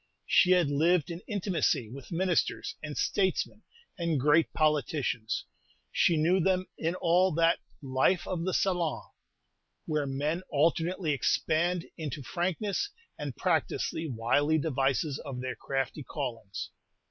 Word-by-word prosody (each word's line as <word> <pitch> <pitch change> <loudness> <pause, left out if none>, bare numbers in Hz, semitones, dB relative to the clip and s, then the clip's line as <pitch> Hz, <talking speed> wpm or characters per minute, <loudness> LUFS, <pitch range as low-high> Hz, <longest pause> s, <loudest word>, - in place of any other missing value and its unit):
She 180 - +5
had 175 -5 +3
lived 165 +3 +2
in 170 +1 -6
intimacy 185 - 0
with 135 +7 -10
ministers, 175 0 0
and 150 -2 -6
statesmen, 190 -2 0 0.4
and 165 -4 +1
great 150 +4 +4
politicians. 150 -7 0 0.5
She 170 - +3
knew 170 +5 +3
them 185 +1 +2
in 165 +2 -1
all 180 +2 +3
that 165 +1 +3 0.2
"life 135 +7 +2
of 175 -2 -2
the 185 - 0
salon" 180 -4 0 0.8
where 150 -3 -1
men 145 +6 -1
alternately 165 +3 +1
expand 165 +5 +1
into 150 -2 -4
frankness, 190 - -1 0.3
and 145 -4 -4
practise 170 -4 0
the 160 0 -4
wily 145 +5 +2
devices 140 -1 0
of 135 -3 -6
their 130 0 -3
crafty 135 +2 -3
callings. 125 -8 -5
160 Hz, 130 wpm, -29 LUFS, 140-175 Hz, 0.8 s, She